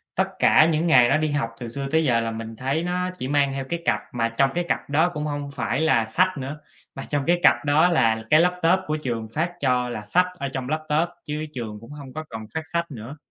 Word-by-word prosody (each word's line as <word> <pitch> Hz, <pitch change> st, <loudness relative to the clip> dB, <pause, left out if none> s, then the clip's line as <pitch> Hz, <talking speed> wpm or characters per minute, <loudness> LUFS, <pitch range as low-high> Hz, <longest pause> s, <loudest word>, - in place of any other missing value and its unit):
tất -, -, +2 dB
cả 155 Hz, -, +6 dB
những 160 Hz, +2 st, +1 dB
ngày 125 Hz, -7 st, +6 dB
nó -, -, +4 dB
đi 155 Hz, -, 0 dB
học 115 Hz, -6 st, -1 dB
từ 120 Hz, -, -5 dB
xưa 140 Hz, +4 st, -4 dB
tới 160 Hz, 0 st, +3 dB
giờ 120 Hz, -4 st, +3 dB
là 115 Hz, 0 st, -2 dB
mình 115 Hz, 0 st, -6 dB
thấy 135 Hz, +7 st, -1 dB
nó 180 Hz, +1 st, -1 dB
chỉ 130 Hz, -, -4 dB
mang 140 Hz, -1 st, +2 dB
theo 135 Hz, -1 st, -4 dB
cái 170 Hz, 0 st, -2 dB
cặp, 105 Hz, -, +2 dB
mà 115 Hz, -1 st, 0 dB
trong 135 Hz, +4 st, +2 dB
cái 175 Hz, -, +1 dB
cặp -, -, -2 dB
đó 160 Hz, +5 st, +3 dB
cũng 150 Hz, -2 st, -3 dB
hông 145 Hz, -1 st, -3 dB
phải 140 Hz, -, -1 dB
là 135 Hz, -8 st, +3 dB
sách 185 Hz, +10 st, +1 dB
nữa, 140 Hz, +2 st, -5 dB, 0.4 s
mà 135 Hz, -, -6 dB
trong 145 Hz, -2 st, 0 dB
cái 175 Hz, +1 st, +3 dB
cặp -, -, +4 dB
đó 155 Hz, +4 st, +4 dB
là 115 Hz, -9 st, +2 dB
cái 155 Hz, -, +6 dB
laptop 180 Hz, +1 st, +3 dB
của 155 Hz, -2 st, -1 dB
trường 115 Hz, -3 st, -3 dB
phát 170 Hz, +3 st, 0 dB
cho, 125 Hz, -4 st, +1 dB
là 110 Hz, -3 st, -6 dB
sách 180 Hz, -, +3 dB
ở 140 Hz, -1 st, -2 dB
trong 130 Hz, -1 st, -4 dB
laptop 155 Hz, +2 st, 0 dB, 0.2 s
chứ 150 Hz, +1 st, -3 dB
trường 110 Hz, -4 st, -6 dB
cũng 115 Hz, +5 st, -13 dB
hông 140 Hz, -3 st, -10 dB
có 155 Hz, +1 st, -5 dB
còn 110 Hz, -1 st, -7 dB
phát 160 Hz, -, 0 dB
sách 170 Hz, -1 st, -1 dB
nữa. 125 Hz, +4 st, -8 dB
145 Hz, 255 wpm, -24 LUFS, 120-160 Hz, 0.4 s, cả